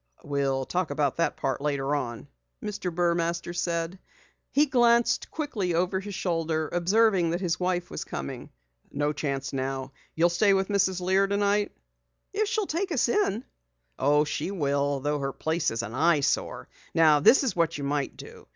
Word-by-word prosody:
"We'll 135 -2 -1
talk 180 +2 -1
about 145 -1 0
that 170 - 0
part 135 0 -2
later 140 -1 -1
on," 120 -3 -4 0.4
Mr. 210 -3 -3
Burmaster 170 0 0
said. 170 +1 -2 0.5
He 295 +2 +4
glanced 240 -3 +3
quickly 215 - -2
over 185 +2 +1
his 200 0 -7
shoulder, 165 -4 -1
observing 185 0 +3
that 170 +2 -1
his 180 -1 -1
wife 180 -1 -1
was - - -4
coming. 70 0 -6 0.4
"No 145 +1 0
chance 140 -2 -3
now. 135 0 -3 0.2
You'll 170 +2 +4
stay 200 +3 +4
with 190 +1 0
Mrs. 190 -2 +1
Lear 190 +2 +3
tonight?" 200 +1 +1 0.6
"If 425 +1 +1
she'll 435 -3 0
take 365 +3 -2
us 270 -6 +2
in." 255 - +1 0.5
"Oh, 145 +2 +4
she 150 +4 -3
will, 140 -6 0
though 145 +1 -1
her 135 0 -2
place 160 +3 -1
is 115 +1 -3
an 115 - -6
eye 155 +3 +3
sore. - - -1 0.3
Now 155 -2 +6
this 255 - +6
is 260 - -1
what 165 -2 +1
you 145 - -5
might 140 0 -2
do. - - -12
170 Hz, 170 wpm, -27 LUFS, 145-195 Hz, 0.6 s, Now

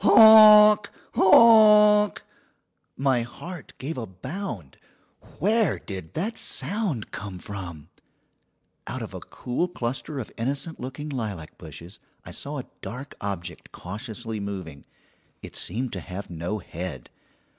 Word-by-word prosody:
"Honk! 215 -1 +8 0.2
honk!" 210 0 +6 0.7
My 135 -2 +1
heart 155 +7 -9
gave 135 +2 -5
a 115 - -5
bound! 100 - -7 0.6
Where 220 +2 +2
did 95 -5 -8
that 210 +8 -3
sound 185 - -3
come 100 -3 -7
from? 90 -5 -8 1.0
Out - - -5
of - - -9
a - - -6
cool 125 +8 -3
cluster 135 -1 -5
of 120 - -7
innocent 140 +7 -3
looking 135 +4 -6
lilac 105 - -5
bushes 85 +4 -11 0.3
I - - -9
saw 145 +1 -5
a 130 - -6 0.2
dark 130 +5 -8
object 90 -4 -6
cautiously 110 +3 -7
moving. 95 -8 -7 0.6
It - - -10
seemed 120 +7 -2
to 95 - -4
have 90 +2 -8
no 85 +5 -4
head. 85 - -8
125 Hz, 125 wpm, -25 LUFS, -, 1.0 s, Honk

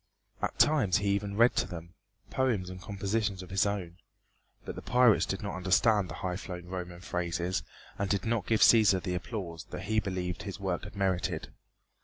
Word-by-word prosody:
At - - -2
times 130 -12 +4
he 100 -1 0
even 100 0 -1
read 120 +2 +5
to - - +2
them 85 -1 -8 0.4
poems 115 -9 0
and 95 0 -9
compositions 100 0 -2
of 90 - -12
his 95 +1 +3
own. 90 -4 -3 0.7
But - - -4
the - - -8
pirates 125 -3 +4
did 95 +2 -3
not 100 - -3
understand 95 +2 +3
the 85 - -6
highflown 90 -1 -5
Roman 90 -1 -5
phrases 90 0 -2 0.4
and 100 -1 -1
did 100 -2 0
not 115 -3 0
give 110 -1 +2
Cæsar 105 -5 +7
the 90 - -2
applause 90 -3 -5
that 90 - -7
he 110 +2 +1
believed 90 -3 -3
his 100 -1 -6
work 95 -1 -2
had 105 +1 -10
merited. 95 -2 -1
95 Hz, 185 wpm, -30 LUFS, 90-105 Hz, 0.7 s, Cæsar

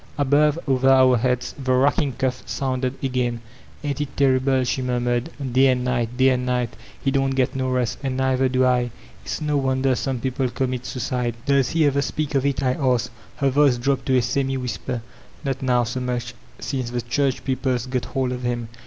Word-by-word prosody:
Above, 145 +2 +3
over 130 0 +3
our 130 -1 +6
heads, 125 +1 0
the 130 - 0
racking 140 +2 +2
cough 130 0 -2
soonded 130 -1 -2
again. 125 -3 0 0.4
"Aint 145 -1 -2
it 145 - -5
terrible?" 130 -1 +3
she 125 +1 -1
murmured. 120 +1 0 0.2
"Day 135 +2 +5
and 125 -1 +1
nig^t, 120 -2 +1
day 130 +1 +5
and 125 -1 0
nig^t; 125 -2 0 0.3
he 135 - +2
don't 135 -1 +1
get 130 -1 +1
no 130 -1 -1
rest, 125 -2 -1
and 135 -1 -2
nei^er 130 0 +2
do 130 0 +3
I. 125 -1 +2 0.3
It's - - -4
no 150 -1 0
wonder 130 -1 +1
some 130 0 -2
people 130 +1 -1
commits 125 0 -3
suidde." 125 -1 -2
"Does 140 -3 +3
he 165 -2 +2
ever 140 0 +2
speak 150 +1 -2
of 135 0 +2
it?" 140 -1 -1
I 130 -1 +2
asked. 125 -4 0 0.2
Her 140 -1 +1
voice 140 -2 +4
dropped 135 +2 -1
to 130 -1 +4
a 125 - +2
semi 135 +2 0
whisper. 125 -1 -4 0.4
"Not 135 -1 -2
now 125 -2 +2
so 120 +3 -3
much, 125 -1 -3 0.2
since 130 -4 -3
the 120 0 -2
church 135 +2 0
people's 130 -2 0
got 125 -1 -2
hold 130 -1 -1
of 125 0 -4
him. 120 -2 -2
130 Hz, 200 wpm, -23 LUFS, 125-135 Hz, 0.4 s, our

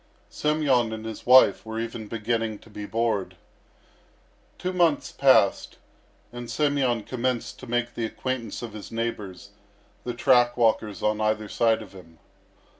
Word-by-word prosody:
Semyon 145 -7 +1
and 110 0 -7
his 110 +1 -8
wife 125 -6 +6
were 110 0 -5
even 115 -1 -5
beginning 115 0 -2
to 110 - -19
be 105 0 -7
bored. 115 -4 -1 1.2
Two 185 +1 -3
months 170 -5 +2
passed, 130 -8 +3 0.6
and 120 -1 -7
Semyon 140 -6 +1
commenced 125 0 -3
to - - -10
make 120 0 -1
the 115 - -2
acquaintance 125 0 -4
of 115 -3 -7
his 105 -1 -9
neighbours, 105 -4 -5 0.5
the 120 -1 -4
track 120 -1 +3
walkers 110 -3 +1
on 105 0 +1
either 110 0 0
side 115 0 +1
of 100 - -15
him. 85 -4 -15
115 Hz, 145 wpm, -25 LUFS, 110-125 Hz, 1.2 s, wife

